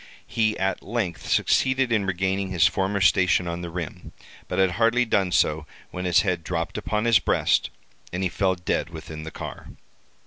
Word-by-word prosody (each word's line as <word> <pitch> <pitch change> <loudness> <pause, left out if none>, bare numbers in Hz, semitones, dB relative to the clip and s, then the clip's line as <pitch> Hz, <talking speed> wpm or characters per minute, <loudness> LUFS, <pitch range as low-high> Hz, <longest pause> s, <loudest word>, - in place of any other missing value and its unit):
He 110 -1 0
at 95 0 -1
length 100 -7 -3
succeeded 130 -1 +2
in 105 -4 +1
regaining 95 +1 -1
his 90 -4 +3
former 95 0 0
station 90 +1 +3
on 85 0 -4
the 85 - -5
rim, 85 -2 -7 0.3
but 90 - -4
had 95 -1 +3
hardly 115 +5 +2
done 100 -5 +1
so 80 -2 +1 0.2
when 90 0 -5
his 90 -2 +4
head 90 -4 -1
dropped 85 -1 -3
upon 105 +1 -2
his 115 -4 +5
breast, - - +1 0.4
and 90 +2 -3
he - - +2
fell 95 +1 +1
dead 85 -2 -2
within 80 -1 -8
the - - -5
car. - - -8
95 Hz, 180 wpm, -24 LUFS, 85-100 Hz, 0.4 s, his